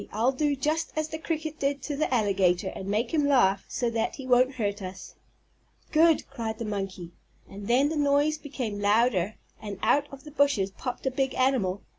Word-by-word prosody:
I'll 235 +4 +2
do 290 +2 0
just 310 +4 -1
as 310 0 -1
the 315 - -5
cricket 315 -1 -4
did 275 -1 -1
to 295 - -3
the 310 0 -1
alligator 195 -5 +2
and 190 - -7
make 220 +6 -1
him 295 -3 +2
laugh 200 -9 +3
so 245 - -2
that 225 -1 -1
he 270 - -8
won't 255 +1 +3
hurt 205 -3 -2
us." 185 0 -8 0.8
"Good!" 325 0 +4
cried 230 -5 -5
the 230 - -4
monkey. 195 -4 -4 0.4
And 200 +1 -9
then 265 +4 +3
the 315 - -2
noise 290 +1 +2
became 250 -9 -5
louder 205 -1 +2 0.3
and 205 -2 -6
out 290 0 +3
from 275 - -10
the 300 - -12
bushes 280 -10 +2
popped 250 +6 -6
a 265 - +1
big 265 +1 -1
animal. 235 -8 +1
255 Hz, 195 wpm, -27 LUFS, 205-285 Hz, 0.8 s, Good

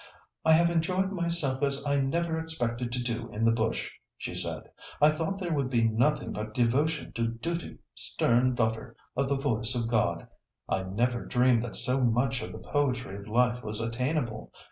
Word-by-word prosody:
"I 160 - +6
have 170 +1 +5
enjoyed 185 +3 +1
myself 170 -7 0
as 140 0 +2
I 140 -1 +2
never 160 +4 0
expected 125 -7 -2
to 125 -1 0
do 115 -1 -3
in 110 +2 -1
the 115 - +5
bush," 115 0 -1 0.3
she - - -5
said; - - -3 0.4
"I 150 +1 +6
thought 160 +5 -2
there 175 -4 -2
would 140 -4 0
be 120 -3 +2
nothing 135 +7 +1
but 110 +1 -5
devotion 140 +6 +1
to 115 0 0
'duty, 125 +10 -4 0.2
stern 125 +2 +2
daughter 110 -1 -1 0.2
of 135 +1 0
the 140 - +2
voice 125 -3 0
of 115 -2 -1
God.' 105 -8 0 0.4
I 95 - 0
never 120 +6 -1
dreamed 125 -2 +3
that 120 -1 -5
so 130 +1 0
much 125 +2 +2
of - - -6
the - - -8
poetry 130 -8 0
of 100 +1 -10
life 125 +2 +2
was 105 0 -3
attainable. 120 +1 -2
125 Hz, 185 wpm, -29 LUFS, 115-150 Hz, 0.4 s, I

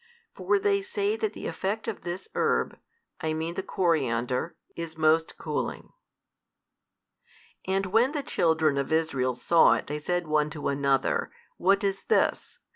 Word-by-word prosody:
For 410 - +1
they 400 0 +2
say 405 +2 -1
that 435 -2 -2
the - - -8
effect 205 +3 -3
of 225 - -4
this 175 +2 -5
herb, - - 0 0.4
I 160 0 -1
mean 160 +2 -3
the 190 - -3
coriander, 135 -6 0 0.2
is 165 -1 -6
most 160 +1 +2
cooling. - - -4 1.7
And 195 +1 +1
when 225 +8 +3
the 290 -2 -2
children 160 - +2
of 140 - -3
Israel 135 -6 +1
saw 165 +7 +5
it - - -2
they 150 +1 -4
said 175 +3 -1
one 150 -1 +1
to 150 -1 -3
another, 140 -1 +1 0.3
What 195 +3 +3
is 195 -1 0
this? 450 - +1
165 Hz, 150 wpm, -27 LUFS, 150-195 Hz, 1.7 s, saw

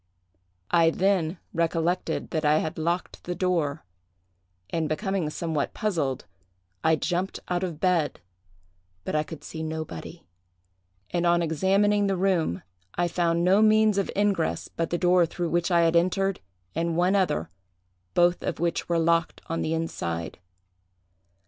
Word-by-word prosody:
I 165 -1 +5
then 185 -1 +1 0.2
recollected 170 +1 -1
that 160 -2 -1
I 150 0 +4
had 155 0 -2
locked 170 +3 -2
the 175 - -3
door; 170 - -1 0.9
and, 160 -2 -1
becoming 190 0 -1
somewhat 155 -2 -2
puzzled, 165 - -1 0.6
I 160 0 +4
jumped 180 +3 -2
out 180 0 0
of 170 -5 -4
bed; 175 -5 +1 0.8
but - - -4
I 155 - +2
could 155 0 -8
see 160 - -7
nobody; 155 - -6 0.9
and 175 0 +1
on 170 0 +3
examining 195 +5 +2
the 195 -1 0
room 175 - +1 0.3
I 175 - +1
found 170 0 +1
no 190 +4 +5
means 215 -1 +4
of 195 - -1
ingress 200 -5 0
but 165 -1 -3
the 175 - 0
door 180 -1 +4
through 170 +1 -3
which 175 +1 +1
I 170 -2 +4
had 165 0 +3
entered, 185 +3 +2 0.3
and 165 0 -1
one 180 +3 +3
other; 85 - 0 0.6
both 175 0 +3
of 170 - -3
which 170 +1 -1
were 170 - +2
locked 165 0 +1
on 165 - -1
the 160 - 0
inside. 85 - -4
170 Hz, 150 wpm, -26 LUFS, 160-185 Hz, 0.9 s, I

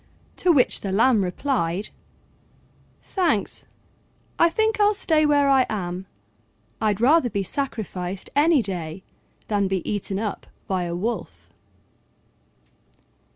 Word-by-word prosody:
To 360 - +3
which 275 -6 +3
the 195 - -3
Lamb 220 +1 +4
replied, 190 -2 -1 1.1
"Thanks, 335 - -1 0.7
I 335 - +6
think 440 +4 0
I'll 415 0 +4
stay 310 -5 +2
where 285 -1 +3
I 265 -2 +4
am: 185 -3 -4 0.7
I'd 210 -2 +1
rather 265 +2 +4
be 200 -3 -2
sacrificed 195 -7 -4
any 295 -2 +4
day 180 -2 -5 0.4
than 205 -2 +1
be 190 -2 -2
eaten 200 -1 -2
up 210 -1 -4 0.2
by 185 -2 -1
a 170 0 -3
Wolf." 175 - -5
215 Hz, 115 wpm, -23 LUFS, 190-285 Hz, 1.1 s, I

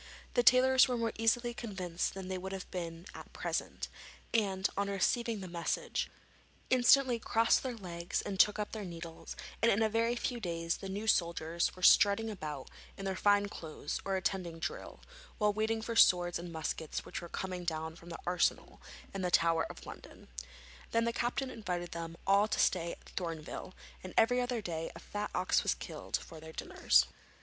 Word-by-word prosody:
The 245 - +4
tailors 255 +2 +6
were 250 -1 0
more 230 -1 0
easily 240 +1 +2
convinced 185 -8 -3
than 190 -1 -6
they 185 0 -3
would 190 +1 -5
have 190 -1 -5
been 170 -1 -5
at - - -10
present, - - -3 0.5
and, 195 -4 +2
on 200 0 0
receiving 220 +3 0
the 185 - -6
message, 170 -1 -2 0.6
instantly 255 -1 +5
crossed 225 0 +3
their 255 -2 -3
legs 175 -5 -3
and 195 -2 -4
took 210 0 +6
up 210 -1 -3
their 215 -2 -5
needles, 170 -2 -8 0.3
and 230 - +5
in 215 +3 +3
a 220 - +3
very 230 +2 +1
few 245 0 -2
days 170 -4 -2
the 195 - -7
new 205 +3 -4
soldiers 170 -4 +1
were 185 - -11
strutting 210 +4 +6
about 150 -8 -6 0.3
in 195 - -6
their 190 -1 -1
fine 205 +1 +3
clothes 155 -6 -5
or 195 -1 -1
attending 185 -3 -2
drill, 165 - -5 0.4
while 210 -2 +2
waiting 220 +1 0
for 230 - -3
the 225 - +8
swords 175 -1 +4
and 170 0 -7
muskets 160 -1 -3
which - - -5
were 170 - -8
coming 185 0 -4
down 160 -1 -3
from 170 0 -13
the 170 - -5
arsenal 180 0 0 0.3
in 195 - -3
the 180 - 0
Tower 165 -1 +3
of - - -10
London. - - -11 0.6
Then 230 0 +2
the 235 - 0
captain 255 +3 -1
invited 180 -7 -4
them 165 0 -6
all 200 +2 +5
to 215 - -1
stay 170 -2 +2
at - - -15
Thorneville, 165 0 -5 0.3
and 185 - -8
every 245 +2 +5
other 245 -3 -2
day 165 -2 -3
a - - -8
fat 210 0 -4
ox - - +3
was - - +1
killed - - -4
for 160 - -11
their 160 0 -10
dinners. - - +3
190 Hz, 190 wpm, -33 LUFS, 170-225 Hz, 0.6 s, the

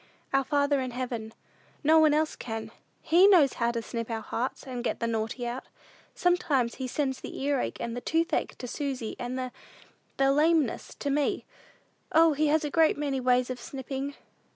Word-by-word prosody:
"Our 270 0 +4
Father 285 0 +1
in 255 - -3
heaven. 240 -3 -4 0.5
No 315 +2 +6
one 310 -1 +6
else 310 +1 +1
can. 225 -2 -6 0.3
He 350 +5 +6
knows 335 -10 +6
how 235 - +3
to 235 -1 -2
snip 230 +1 -5
our 225 -1 -2
hearts, 240 +3 -3
and 250 -2 -5
get - - -2
the - - -1
naughty 225 +2 -2
out. 240 +2 -4 0.5
Sometimes 295 -9 +2
he 260 - -1
sends 265 0 -1
the - - -7
earache 280 -2 -1
and 235 0 -3
the 245 - -4
toothache 330 +4 0
to 250 - -6
Susy, 260 -4 -3
and 250 +1 -3
the 255 -1 -3 0.7
the 270 0 +4
lameness 305 -2 +2
to 285 - -2
me. 290 0 0 0.7
O, 325 0 +6
he 305 +2 +1
has 310 +1 +2
a 295 - -3
great 320 0 +4
many 285 -2 -1
ways 250 0 +2
of 250 - -5
snipping!" 270 +2 -5
270 Hz, 185 wpm, -28 LUFS, 245-295 Hz, 0.7 s, No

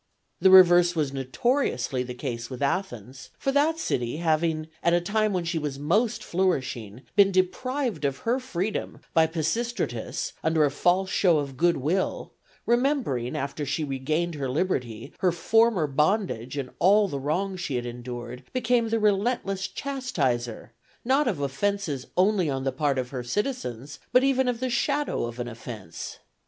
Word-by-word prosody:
The 190 - +5
reverse 175 -2 +7
was 145 -4 0
notoriously 135 - 0
the 125 0 -5
case 120 -3 -5
with 130 +1 -5
Athens; 135 - -3
for 270 - -1
that 300 +4 +2
city, 120 - -2
having, 160 -1 0
at 170 0 +3
a - - +4
time 215 +4 0
when 180 -3 -1
she 165 0 -1
was 145 -3 -4
most 200 - +1
flourishing, 130 - -1
been 200 -1 +6
deprived 215 - -1
of 140 -1 0
her 240 +3 +2
freedom 215 -5 -3
by 160 0 +5
Pisistratus 170 - -2
under 160 -1 +3
a 145 - 0
false 180 +6 +1
show 175 -5 +4
of 140 -2 -3
good 170 +4 +2
will, 165 +8 -1 0.3
remembering, 240 - +1
after 140 +2 -3
she 145 +3 -1
regained 155 +5 -1
her 140 -3 -3
liberty, 130 - -2
her 185 -2 +3
former 220 +1 +3
bondage 150 - 0
and 130 -2 -4
all 205 +3 +5
the 140 -6 -4
wrongs 180 +7 -2
she 145 -6 -3
had 120 0 -2
endured, 120 0 -7
became 240 -2 +1
the 225 - +1
relentless 200 -2 +1
chastiser, 145 - -2 0.3
not 270 +3 +3
of 195 -11 -1
offences 145 0 -2
only 185 -3 +3
on 135 -1 -2
the 135 - 0
part 140 0 0
of 125 -1 -2
her 130 -2 -3
citizens, 140 - -3
but 250 - +5
even 265 -1 +2
of 245 -1 -1
the 255 - 0
shadow 285 - 0
of 120 +1 -7
an 120 - -3
offence. 110 -7 -8
165 Hz, 165 wpm, -26 LUFS, 130-210 Hz, 0.3 s, reverse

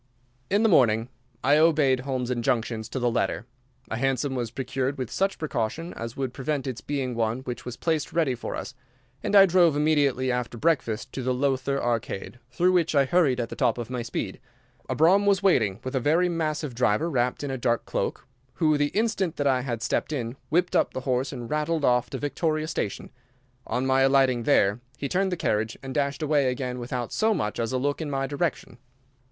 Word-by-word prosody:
In 205 +3 +2
the - - +5
morning 115 - +4 0.3
I 145 +3 +5
obeyed 150 -5 +4
Holmes's 125 -1 -2
injunctions 115 -2 -1
to - - -5
the 120 -2 +1
letter. 115 - -1 0.5
A 115 - -1
hansom 135 +2 0
was 120 -3 -2
procured 130 +2 -3
with 130 -4 -4
such 195 +1 0
precaution 155 +3 -3
as 115 +1 -7
would 130 -2 -2
prevent 140 0 -2
its 130 -3 -4
being 135 -3 -2
one 115 +2 -1
which 125 -2 -6
was 125 -1 -6
placed 160 -3 -1
ready 160 -6 +1
for 120 - -5
us, 130 - -6 0.5
and 205 - -1
I 195 -1 +10
drove 175 -4 +4
immediately 145 -4 +2
after 125 -1 -3
breakfast 130 -5 0
to 135 - -4
the 130 0 0
Lowther 135 +1 0
Arcade, 120 -1 -3
through 175 +9 +2
which 170 -4 +2
I 140 -1 +5
hurried 140 -4 +2
at 115 -1 -2
the - - -6
top - - +1
of 120 0 -5
my 125 -1 -2
speed. 115 -4 -4 0.5
A 130 - -1
brougham 190 +7 +4
was 200 -1 +3
waiting 110 - +3
with 130 - -5
a - - +2
very 160 +7 +2
massive 155 -4 -2
driver 120 +4 +1
wrapped 125 -4 0
in 140 - -3
a 130 - -2
dark 120 -1 0
cloak, - - -3 0.3
who, 155 -2 +2
the 145 0 +2
instant 200 -6 0
that 145 - -2
I 130 -2 +3
had 120 -3 -4
stepped - - -1
in, 120 -4 -3
whipped 175 +3 +1
up - - +2
the 130 - -2
horse 130 0 -1
and 120 -4 -6
rattled 150 +2 0
off 125 0 +2
to - - -4
Victoria 155 +1 -1
Station. 105 -9 -4 0.6
On 125 +1 -1
my 135 0 +3
alighting 135 -2 +4
there 100 +2 +3 0.2
he 140 - -3
turned 190 +4 0
the 180 - -1
carriage, 110 -5 -1
and 135 -1 -5
dashed 140 +1 -1
away 145 -3 +2
again 125 0 -3
without 120 0 -4
so 220 0 +2
much 105 - -2
as 115 0 -1
a 130 - 0
look 145 +4 -1
in 155 - -3
my 135 -1 -1
direction. 140 -3 -3
135 Hz, 210 wpm, -26 LUFS, 125-155 Hz, 0.6 s, I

